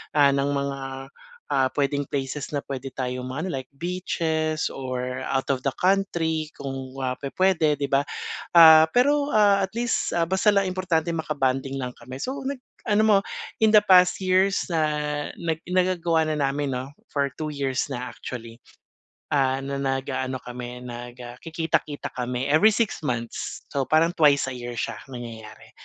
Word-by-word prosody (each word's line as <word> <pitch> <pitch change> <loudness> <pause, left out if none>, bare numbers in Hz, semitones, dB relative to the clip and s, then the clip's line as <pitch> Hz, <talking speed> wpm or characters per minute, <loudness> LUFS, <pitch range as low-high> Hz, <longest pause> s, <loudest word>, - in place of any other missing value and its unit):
ah, 140 -1 +6
ng 140 0 +1
mga, 140 0 -2 0.7
ah, 130 -1 +3
pwedeng 140 0 0
places 135 0 -3
na 140 - -2
pwede 135 0 -5
tayong 125 -1 -3
mag 135 +6 -4
ano, 185 - -3
like 130 -1 -4
beaches 160 -2 -1
or 130 -1 -4
out 135 -1 -1
of 130 - 0
the 135 - 0
country 170 -5 +1
kung, 135 -1 -6
ah, 130 0 -2
pwe-pwede, 160 +1 +2
'di 140 -1 -3
ba?" 140 +1 +2 0.5
Ah, 160 -1 +9
pero, 285 - +3
ah, 205 -3 +4
at 190 - -1
least, 240 -1 0
ah, 170 -1 +2
basta 190 +4 +3
lang 200 -1 +2
importante 180 -3 0
maka-bonding 135 -4 -1
lang 125 -1 -4
kami, 130 +2 -10
so 260 - -3
nag 275 0 -3 0.2
ano 215 -2 +2
mo, 210 - +6 0.5
in 220 - +6
the 215 - +8
past 180 -2 +6
years 190 +1 +2
na 165 -3 0 0.6
nag 165 -1 -2
nagagawa 175 -3 +2
na 155 - 0 0.2
namin 140 -1 -2
'no, 130 +2 -4 0.2
for 140 -1 -1
two 155 - -3
years 135 -2 -1
na, 130 -3 -5
actually. 115 -2 -8 0.8
Ah, 135 -2 +2
na 140 0 -3
nag-aano 135 -1 -2
kami 125 0 -8
nagakikita-kita 125 +6 -4
kami 125 +1 -2
every 155 +9 +5
six 220 -5 0
months. 120 -5 -4
So, 140 - +1
parang 165 +2 +3
twice 145 -5 +4
a 130 - -4
year 120 -1 -6
siya - - -3
nangyayari. 115 -3 -9
140 Hz, 165 wpm, -25 LUFS, 130-170 Hz, 0.8 s, Ah